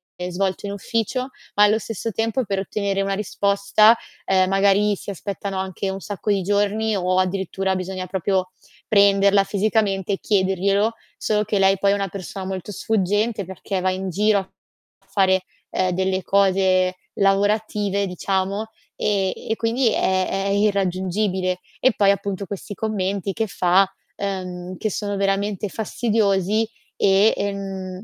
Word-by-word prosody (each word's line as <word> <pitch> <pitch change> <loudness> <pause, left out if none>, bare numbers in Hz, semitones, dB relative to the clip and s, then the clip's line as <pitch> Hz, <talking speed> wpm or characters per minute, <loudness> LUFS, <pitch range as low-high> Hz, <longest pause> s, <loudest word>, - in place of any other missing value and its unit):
ehm, 180 0 -5
svolto 190 +2 -2
in - - -4
ufficio, 230 +5 -2 0.3
ma 205 - +6
allo 210 +1 +4
stesso 225 +1 -4
tempo 225 +3 0
per 195 -1 -1
ottenere 195 0 -1
una 195 0 -1
risposta, 205 +2 +3 0.3
uhm, 185 -1 +3
magari 200 +2 +3
si 200 - -9
aspettano 195 0 -4
anche 190 +1 -3
un 190 - -4
sacco 205 0 -5
di 195 -2 +1
giorni, 205 +2 +1
o 185 0 +1
addirittura 190 0 -1
bisogna 185 0 -4
proprio 185 0 -1 0.4
prenderla 200 -1 +5
fisicamente 200 -1 0
e 195 - -2
chiederglielo. 200 +2 +1 0.2
Solo 210 -1 +1
che 205 - 0
lei 195 0 +4
poi 200 0 +3
è - - +3
una 200 -1 -1
persona 190 0 -7
molto 190 +1 -5
sfuggente, 205 +2 0
perché 190 +1 -4
va 185 - +2
in 190 0 -3
giro 210 +3 +3
a 190 - -9 0.6
fare, 190 -2 +2 0.3
ehm, 185 0 +1
delle 190 +1 0
cose 190 -1 +3 0.2
lavorative 200 0 +1
diciamo, 195 +3 -2 0.3
ehm, 195 -3 0 0.2
e 220 - +1
quindi 230 +2 +1
è 185 -2 +1
è 195 0 -1
irraggiungibile. 190 -2 0 0.2
E 260 - +4
poi 200 -2 +4
appunto 200 0 -3
questi 200 +1 -7
commenti 200 -2 -2
che 225 +1 -1
fa, 190 0 +3 0.3
uhm, 185 -2 -4
che 215 - -1
sono 205 +1 -3
veramente 200 +1 0
fastidiosi 215 -1 +1 0.3
e, 200 +2 +4
ehm 195 -2 -4
195 Hz, 150 wpm, -22 LUFS, 190-205 Hz, 0.6 s, ma